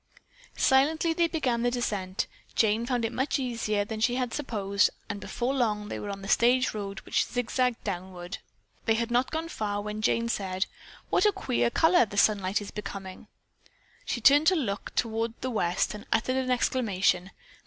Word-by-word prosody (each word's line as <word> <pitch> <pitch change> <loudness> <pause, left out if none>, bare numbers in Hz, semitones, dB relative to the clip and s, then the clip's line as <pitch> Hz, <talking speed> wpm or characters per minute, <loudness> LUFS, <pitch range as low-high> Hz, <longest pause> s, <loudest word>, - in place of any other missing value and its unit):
Silently 310 +5 +3
they 335 +1 +2
began 260 -8 0
the 245 - +2
descent. 205 -6 -2 0.3
Jane 225 +1 +2
found 245 -3 0
it 225 - -2
much 265 +4 0
easier 230 -6 -1
than 220 +1 -5
she 240 +2 +2
had 250 -2 -2
supposed 200 -8 +1 0.2
and 205 -2 -4
before 250 +2 -2
long 215 -5 0
they - - -4
were 205 - -5
on 195 -1 -6
the - - -6
stage 245 +4 +3
road 200 -2 -5
which - - +1
zigzagged 245 0 -1
downward. 180 -2 -5 0.5
They 225 - +3
had 230 +1 -1
not 245 +2 +2
gone 320 +1 -3
far 205 -9 -3
when 210 +1 -4
Jane 230 +2 +1
said: 190 -4 -1 0.5
"What - - +4
a - - +4
queer 120 - 0
color 325 - +4
the 205 - -8
sunlight 200 -1 +3
is 205 - -7
becoming." 195 -3 -7 0.8
She 240 - -3
turned 290 +6 +6
to 375 - +6
look 210 - -2
toward 225 0 -1
the 255 - -2
west 180 -5 0
and 210 - -9
uttered 235 +3 +1
an 260 -1 -1
exclamation. 205 -7 +1
225 Hz, 180 wpm, -28 LUFS, 205-255 Hz, 0.8 s, turned